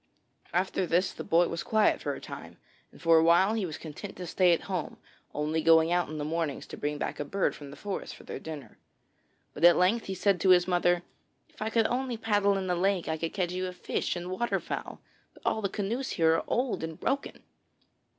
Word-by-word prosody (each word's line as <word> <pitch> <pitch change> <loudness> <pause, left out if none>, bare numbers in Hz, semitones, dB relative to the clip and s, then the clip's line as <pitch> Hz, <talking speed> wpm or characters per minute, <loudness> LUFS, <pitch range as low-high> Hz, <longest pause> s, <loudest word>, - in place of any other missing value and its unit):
After 185 +1 0
this 180 +3 +2
the - - -7
boy 170 +1 +3
was 170 - -3
quiet 220 -1 +2
for - - -2
a - - -8
time, - - -9 0.3
and - - -17
for 165 -1 +5
a - - +3
while 175 +5 +5
he 215 -5 -1
was 155 - -6
content 165 +6 -8
to 180 - -6
stay 180 +1 +3
at 170 - +2
home, 185 -5 -4 0.3
only 155 +2 -1
going 165 +1 +5
out 175 0 +1
in 155 - -5
the 145 - -3
mornings 160 -2 -2
to - - -3
bring 150 0 -3
back - - -4
a - - 0
bird 190 +7 -1
from 145 -1 -10
the 140 - -11
forest 200 -2 -5
for - - -14
their - - -6
dinner. 155 -4 -9 0.7
But 150 - -7
at 175 0 +8
length 200 +6 +2
he 190 - -3
said 190 -1 +1
to 190 - +3
his 180 -1 +6
mother: 175 -1 +2 0.5
'If - - -20
I 215 - 0
could 225 0 +2
only 250 0 -1
paddle 205 -3 +2
in 190 - -3
the 180 - 0
lake, 185 0 +1
I 160 - 0
could 165 0 -3
catch 180 -3 0
you 185 0 -2
fish 180 - -2
and 175 +1 -5
water 240 +6 0
fowl; - - -6 0.3
but - - -19
all 220 - +1
the 200 - -1
canoes 225 +7 -2
here 160 -2 +3
are - - 0
old 250 -7 0
and 160 -1 -5
broken.' 275 +1 -2
180 Hz, 230 wpm, -29 LUFS, 165-200 Hz, 0.7 s, at